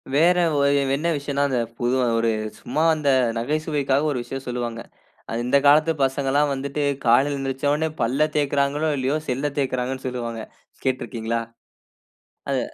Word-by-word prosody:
வேற 170 +4 +5 0.2
ஓ - - +2 0.4
என்ன 160 +4 -2
விஷயன்னா, 140 0 -1
அந்த 130 -2 0 0.2
புது 120 +1 0 0.2
ஒரு 115 0 +2 0.3
சும்மா 155 - -1
அந்த 150 -2 0 0.3
நகைச்சுவைக்காக 145 +2 0
ஒரு 135 - -2
விஷயம் 135 +2 -7
சொல்லுவாங்க. 120 -2 -3 0.6
இந்த 125 +3 +3
காலத்து 155 +3 +5
பசங்கள்லாம் 140 +2 +1
வந்துட்டு 140 +2 -3 0.2
காலையில 125 +5 +4
எழுந்திருந்தவுனே 140 +3 -1
பல்ல 135 +6 +2
தேய்க்கிறார்களோ! 145 +1 +1
இல்லயோ! 135 +3 0
செல்ல 135 +3 -1
தேய்கிறாங்கன்னு 130 -1 -2
சொல்லுவாங்க. 120 -3 -4 0.4
கேட்டிருக்கீங்களா? 115 -3 -2 1.1
அது - - +1
135 Hz, 125 wpm, -23 LUFS, 125-145 Hz, 1.1 s, வேற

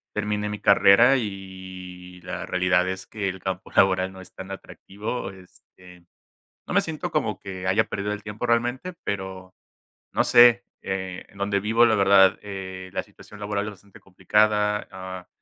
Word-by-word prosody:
terminé 105 0 -1
mi 105 0 -5
carrera, 110 +6 +6
y, 95 -4 -7
la - - -5
realidad 90 0 +2
es 95 0 -5
que, 105 -3 -3
el 95 -1 -5
campo 95 0 -5
laboral 95 -1 +3
no 95 - -11
es 95 0 -13
tan 95 0 -9
atractivo, 100 +2 -6
este, 90 -1 -17 0.6
no - - -5
me - - +6
siento, - - -4
como - - -1
que 95 -1 -7
haya 95 +1 +3
perdido 105 +1 -3
el 105 - -5
tiempo, 105 +3 -5
realmente, 120 +9 0
pero, 95 -2 -5 0.6
no - - +2
sé. 120 0 +6 0.2
Eh, 95 -1 -4
en 100 - -18
dónde 100 0 0
vivo, 115 +3 +3
la 110 -2 +4
verdad, 95 -1 +5
eh, 95 -2 -7
la - - -2
situación 105 +1 -15
laboral 105 0 -2
es 105 - -4
bastante 100 0 -17
complicada. 105 +2 +1
Ah, 95 -1 -8
95 Hz, 165 wpm, -24 LUFS, 95-105 Hz, 0.6 s, carrera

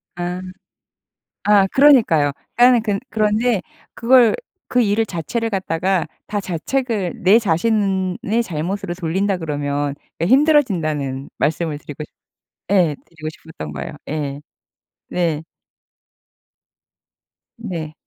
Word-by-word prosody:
아. 175 +1 -3 1.0
아 205 -1 +5
그러니까요. 220 - +5 0.2
그러니까 245 0 +6
근 205 -3 0
그런데 215 0 +1 0.3
그걸 240 -1 +5 0.3
그 250 - +2
일을 220 +1 +2
자체를 220 +6 -3
갖다가 185 -2 0 0.2
다 205 -1 -2
자책을 200 +2 -2
내 200 +5 +6
자신의 200 +2 0
잘못으로 175 +2 -3
돌린다 190 +3 0
그러면 145 -3 -2 0.3
예 - - +2
힘들어진다는 170 - +2
말씀을 155 0 0
드리고 145 0 -8
시 - - -14 0.6
예 180 -6 +3
드리고 160 -2 -8
싶었던 155 - -9
거예요. 75 - -6 0.2
예. 145 -2 -3 0.7
네. 165 -4 -1 2.1
네. 170 -9 -5
185 Hz, 235 characters per minute, -20 LUFS, 155-220 Hz, 2.1 s, 그러니까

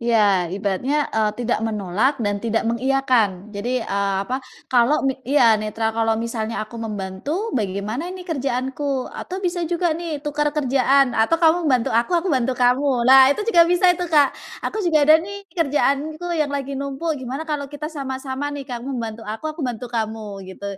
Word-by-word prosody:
Iya, 205 -7 +3
ibaratnya, 200 - -1 0.2
eee, 215 -1 +2
tidak 240 -2 -1
menolak 215 +5 0
dan 205 0 -1
tidak 225 0 -1
mengiyakan, 235 -5 +1
jadi, 235 +4 -2
eee, 200 0 -1
apa, 255 +4 -3 0.3
kalau 250 +4 +3
mi 270 - +2 0.2
iya, 230 -7 +5
netral, 220 +1 -2
"Kalau 225 0 +1
misalnya 230 0 -3
aku 230 +2 -10
membantu, 220 - -4
bagaimana 215 - -2
ini 365 0 -8
kerjaanku?" 270 -2 -2
Atau 375 +1 -6
bisa 350 0 -1
juga 345 -1 +1
nih 315 -3 -5
tuker 295 0 0
kerjaan, 270 -1 +3
"Atau 225 +9 +2
kamu 330 0 +3
bantu 250 -5 +2
aku, 240 +10 +2
aku 340 0 0
bantu 255 -1 +1
kamu." 250 0 +2
Lah 265 +1 +8
itu 285 +10 0
juga 420 -7 +4
bisa 355 +1 +4
itu 355 0 -4
Kak, 295 -4 +4 0.3
"Aku 435 - -2
juga 320 -6 +3
ada 310 +2 +6
nih 400 +3 -8
kerjaanku 310 +1 0
yang 305 -3 0
lagi 280 -1 -3
numpuk, 280 +4 -2
gimana 265 +5 -5
kalau 295 -3 -3
kita 300 +2 -6
sama-sama 265 -1 -4
nih, 285 -1 -6
kamu 245 0 -6
bantu 225 -1 -5
aku, 265 +9 -4
aku 325 - -10
bantu 250 -3 -3
kamu 220 -3 -4
gitu? 190 +2 -10
265 Hz, 175 wpm, -21 LUFS, 225-300 Hz, 0.3 s, Lah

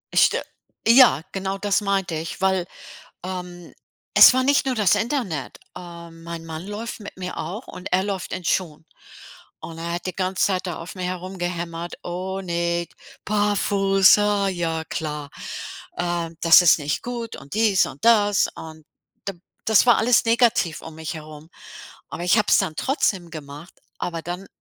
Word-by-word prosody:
St - - +5 0.5
ja, 230 - +7
genau 195 0 -3
das 205 +1 +1
meinte 195 -4 -1
ich, 160 +4 -5
weil, 190 -2 +1 0.6
ähm, 180 -2 -7 0.4
es - - +9
war 260 - +2
nicht 280 0 +3
nur 260 - +1
das 210 -5 +3
Internet. 210 - -2 0.2
Ähm, 170 -2 -10
mein 170 -1 -7
Mann 160 +2 -7
läuft 220 +3 -6
mit 205 - -9
mir 180 -1 -6
auch 210 +8 -5
und 180 - -8
er 190 +1 +3
läuft 195 -3 -4
in 185 - -6
Schuhen. 165 -3 -1 0.8
Und 165 -1 -9
er 170 +1 -4
hat 175 - -5
die 185 - -4
ganze 185 0 0
Zeit 185 -1 -1
da 175 - -4
auf 165 - -8
mir 185 -1 -5
herumgehämmert: 175 -2 -4
„Oh 185 +2 -4
ne, 170 -1 -1 0.4
barfuß, 200 -1 +3
ah, 205 -1 +1
ja 165 -3 -2
klar. 150 -3 -5 0.7
Äh, 175 -1 -2
das 165 +1 +8
ist 170 - +6
nicht 150 0 -2
gut 235 -2 -5
und 140 +5 -10
dies 215 -4 +3
und 140 - -9
das” 205 -3 +4
und 160 -1 -10 0.4
d - - -2 0.3
das 220 +3 +5
war 240 - +6
alles 235 +1 +3
negativ 230 -7 +2
um 160 - -9
mich 160 +1 -5
herum. 155 0 -10 0.6
Aber 175 - -6
ich 180 +5 +4
habe 210 - +1
es - - +6
dann 185 -6 -1
trotzdem 195 - 0
gemacht, 150 +2 -10 0.3
aber 170 -2 -3
dann 180 +3 -6
180 Hz, 170 wpm, -23 LUFS, 165-205 Hz, 0.8 s, es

